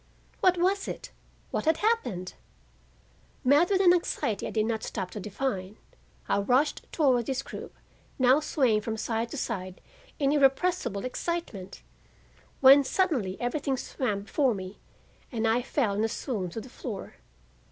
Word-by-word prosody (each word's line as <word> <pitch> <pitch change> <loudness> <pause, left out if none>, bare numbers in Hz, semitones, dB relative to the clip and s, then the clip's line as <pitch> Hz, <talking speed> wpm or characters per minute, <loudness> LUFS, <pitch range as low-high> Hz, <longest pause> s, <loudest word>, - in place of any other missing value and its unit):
What 365 -1 +4
was 385 +3 +1
it? - - -6 0.4
What - - -2
had 320 0 +3
happened? 245 - 0 1.1
Mad 290 +6 +5
with 390 -1 +3
an 355 -2 +7
anxiety 230 - -1
I - - -4
did 215 -1 0
not 220 -1 -1
stop 185 - -4
to 210 - -6
define, 205 -1 -3 0.5
I - - +2
rushed 255 +8 +1
toward 255 -7 +2
this 270 0 -1
group - - -9 0.4
now 260 +2 +5
swaying 255 -8 +2
from 220 +1 -3
side 225 +1 -2
to 295 - -6
side 185 -7 -4 0.4
in 275 -2 +2
irrepressible 270 - +2
excitement, 255 - -4 0.8
when 275 +1 +9
suddenly 260 - 0
everything 270 +2 -1
swam 210 -6 -2
before 260 +2 +1
me 190 +1 -8 0.5
and 225 -3 0
I 225 +2 +3
fell 245 -4 0
in 210 +2 0
a 225 - +1
swoon 210 -6 -3
to 200 - -6
the 250 - -11
floor. 230 -5 -7
250 Hz, 150 wpm, -28 LUFS, 210-295 Hz, 1.1 s, when